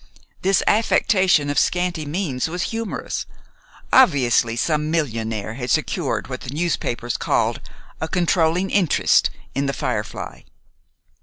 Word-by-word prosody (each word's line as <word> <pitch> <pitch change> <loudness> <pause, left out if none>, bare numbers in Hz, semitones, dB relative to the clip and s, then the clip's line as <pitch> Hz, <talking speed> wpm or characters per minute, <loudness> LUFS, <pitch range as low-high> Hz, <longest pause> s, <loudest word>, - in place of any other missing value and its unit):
This 195 +1 +2
affectation 190 -8 +3
of 145 - +2
scanty 175 -4 0
means 150 -4 -2
was 175 +1 -2
humorous. 225 -2 -4 0.7
Obviously, 125 - +4
some 150 +4 0
millionaire 115 -9 -2
had 125 +1 -5
secured - - -1
what - - -6
the - - -8
newspapers 135 -8 -2
called - - 0 0.4
"a 160 - -1
controlling 175 +1 +1
interest" 185 -7 +3 0.2
in 140 +1 -1
"The 140 - -1
Firefly." - - -4
160 Hz, 120 wpm, -21 LUFS, 125-180 Hz, 0.7 s, Obviously